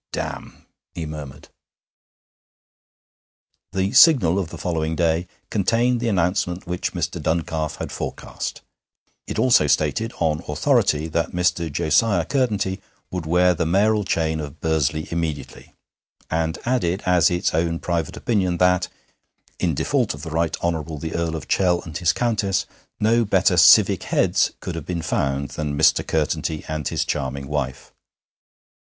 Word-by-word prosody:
'Damn!' -, -, -6 dB, 0.3 s
he 80 Hz, -, -4 dB
murmured. 75 Hz, -3 st, -8 dB, 2.3 s
III 95 Hz, 0 st, +1 dB
The -, -, -8 dB
Signal 100 Hz, -, +6 dB
of 90 Hz, -5 st, -3 dB
the -, -, -8 dB
following 80 Hz, -2 st, -2 dB
day 85 Hz, +1 st, +1 dB, 0.2 s
contained 115 Hz, +4 st, +1 dB
the 120 Hz, -, -2 dB
announcement 90 Hz, -1 st, 0 dB
which 90 Hz, 0 st, -3 dB
Mr. -, -, -3 dB
Duncalf 80 Hz, -1 st, -1 dB
had -, -, -6 dB
forecast; -, -, -5 dB, 0.7 s
it -, -, -4 dB
also 120 Hz, -12 st, +4 dB
stated, 115 Hz, +9 st, +1 dB
on 80 Hz, -2 st, 0 dB
authority, 75 Hz, +1 st, +1 dB
that 80 Hz, 0 st, -1 dB
Mr. 85 Hz, -2 st, 0 dB
Josiah 85 Hz, +5 st, +2 dB
Curtenty 105 Hz, -8 st, -1 dB, 0.3 s
would 90 Hz, -3 st, -4 dB
wear 90 Hz, +2 st, +4 dB
the 80 Hz, -1 st, -1 dB
mayoral 105 Hz, +4 st, +2 dB
chain 80 Hz, -3 st, -1 dB
of 75 Hz, 0 st, -7 dB
Bursley 80 Hz, -1 st, 0 dB
immediately, 80 Hz, -3 st, -5 dB, 0.6 s
and 80 Hz, 0 st, -1 dB
added 105 Hz, -7 st, 0 dB
as 90 Hz, -2 st, +4 dB
its 90 Hz, 0 st, 0 dB
own 85 Hz, +1 st, 0 dB
private 85 Hz, -2 st, -3 dB
opinion 95 Hz, -6 st, 0 dB
that, 90 Hz, 0 st, +3 dB, 0.7 s
in 85 Hz, -5 st, 0 dB
default -, -, 0 dB
of 70 Hz, -, -11 dB
the 80 Hz, -, -6 dB
Right 80 Hz, 0 st, 0 dB
Honourable 80 Hz, -2 st, -2 dB
the 80 Hz, +2 st, -5 dB
Earl 85 Hz, -1 st, -1 dB
of 80 Hz, -, -7 dB
Chell 90 Hz, -2 st, +2 dB
and 80 Hz, -2 st, -10 dB
his 85 Hz, -2 st, +2 dB
Countess, 105 Hz, -2 st, 0 dB, 0.3 s
no 115 Hz, +2 st, +3 dB
better 95 Hz, -2 st, +2 dB
'civic 85 Hz, -, +6 dB
heads' -, -, +1 dB
could 90 Hz, -, -5 dB
have 80 Hz, -2 st, -7 dB
been 85 Hz, -2 st, -3 dB
found 70 Hz, -2 st, -1 dB
than 70 Hz, +1 st, -4 dB
Mr. 75 Hz, 0 st, +4 dB
Curtenty 80 Hz, 0 st, -1 dB
and 75 Hz, -2 st, -3 dB
his -, -, -1 dB
charming 70 Hz, -1 st, -3 dB
wife. 70 Hz, -3 st, -4 dB
85 Hz, 145 wpm, -22 LUFS, 80-95 Hz, 2.3 s, Signal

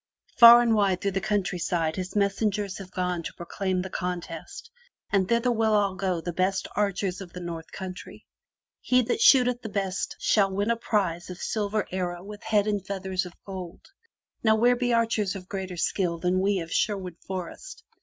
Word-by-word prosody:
Far 235 Hz, 0 st, +10 dB
and 230 Hz, -1 st, +2 dB
wide 200 Hz, -4 st, +2 dB
through 200 Hz, -, -1 dB
the 195 Hz, 0 st, -2 dB
countryside 180 Hz, -5 st, -1 dB
his 185 Hz, +1 st, -5 dB
messengers 200 Hz, 0 st, 0 dB
have 190 Hz, -2 st, -9 dB
gone 180 Hz, -2 st, -2 dB
to -, -, -7 dB
proclaim 185 Hz, +1 st, -2 dB
the 190 Hz, -, -6 dB
contest 180 Hz, -, -5 dB, 0.4 s
and 195 Hz, -2 st, +2 dB
thither 235 Hz, +1 st, +2 dB
will 215 Hz, -4 st, +2 dB
go 190 Hz, 0 st, -1 dB
all 165 Hz, -, -4 dB
the 175 Hz, -, -4 dB
best 185 Hz, +2 st, 0 dB
archers 195 Hz, -2 st, -1 dB
of 180 Hz, -3 st, -10 dB
the 180 Hz, -, -7 dB
North 170 Hz, -2 st, -7 dB
Country. 185 Hz, -1 st, -8 dB, 0.5 s
He 250 Hz, 0 st, +3 dB
that 240 Hz, -, -1 dB
shooteth 250 Hz, -2 st, +5 dB
the 220 Hz, -, -6 dB
best 195 Hz, -2 st, -2 dB
of -, -, -22 dB
all -, -, -34 dB
shall 195 Hz, -3 st, +3 dB
win 205 Hz, +4 st, 0 dB
as 230 Hz, -, -1 dB
prize 180 Hz, -7 st, -1 dB
a 180 Hz, -, -6 dB
silver 210 Hz, +2 st, -2 dB
arrow 180 Hz, -1 st, -3 dB
with 205 Hz, +1 st, -9 dB
head 215 Hz, -2 st, +2 dB
and 205 Hz, -3 st, -1 dB
feathers 190 Hz, -1 st, -3 dB
of 175 Hz, -, -12 dB
gold. 185 Hz, -3 st, -8 dB, 0.6 s
Now 220 Hz, -1 st, +5 dB
where 240 Hz, +3 st, +4 dB
be 245 Hz, 0 st, 0 dB
archers 225 Hz, -4 st, +1 dB
of 185 Hz, -2 st, -8 dB
greater 190 Hz, -2 st, -5 dB
skill 170 Hz, 0 st, 0 dB
than 180 Hz, +2 st, 0 dB
we 195 Hz, -1 st, +1 dB
of 165 Hz, 0 st, -8 dB
Sherwood 190 Hz, -5 st, -1 dB
Forest? 190 Hz, -, -7 dB
195 Hz, 195 wpm, -26 LUFS, 180-215 Hz, 0.6 s, Far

